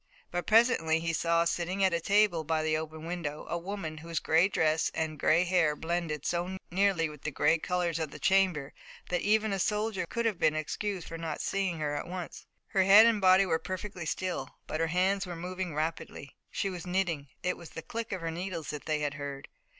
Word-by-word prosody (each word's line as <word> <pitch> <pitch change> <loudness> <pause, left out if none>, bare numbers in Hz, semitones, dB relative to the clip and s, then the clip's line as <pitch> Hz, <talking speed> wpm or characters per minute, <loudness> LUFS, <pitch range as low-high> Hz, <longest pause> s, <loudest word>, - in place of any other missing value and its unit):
But 175 0 -3
presently 215 -9 +4
he 165 0 -2
saw 170 +1 +2
sitting 180 +3 -1
at 190 -2 +3
a 170 - 0
table 200 -3 +3
by 160 0 0
the 155 0 +1
open 160 0 -5
window 165 -4 -4
a 170 - -2
woman 170 -4 -5
whose 165 +1 -6
gray 165 +4 +4
dress 160 -4 +1
and 155 -2 -2
gray 165 +5 +4
hair 175 -4 +2
blended 160 -2 -3
so 175 +2 -1
nearly 190 -3 +2
with 150 -2 -11
the - - -2
gray 150 +3 +2
colors 175 -1 -1
of 160 -2 -2
the - - -10
chamber 185 -7 +2 0.4
that 180 - 0
even 215 0 +2
a 195 - -1
soldier 210 -2 0
could 235 +5 -2
have 215 -6 0
been 155 -1 +3
excused 185 +4 -3
for 165 - -7
not 165 -2 -4
seeing 195 -4 -1
her 150 -2 -2
at - - -4
once. 180 -1 -7 0.2
Her 195 - +2
head 200 +4 +8
and 230 -3 +3
body 185 +1 +6
were 160 -3 +1
perfectly 185 0 -5
still, 180 -8 -2 0.2
but 155 - -4
her 165 - +2
hands 190 +3 +1
were 175 - -5
moving 180 -1 -4
rapidly. 155 -3 -4
She 195 - -2
was 180 -1 -7
knitting, 180 -6 -1 0.2
and 180 - +1
it - - -5
was 170 - -11
the 165 - -8
click 230 -1 -5
of 190 -3 -3
her 165 0 -2
needles 170 -2 -4
that 150 -1 -7
they 155 -1 0
had 145 -1 -1
heard. 140 -1 -7
170 Hz, 220 wpm, -30 LUFS, 160-190 Hz, 0.4 s, head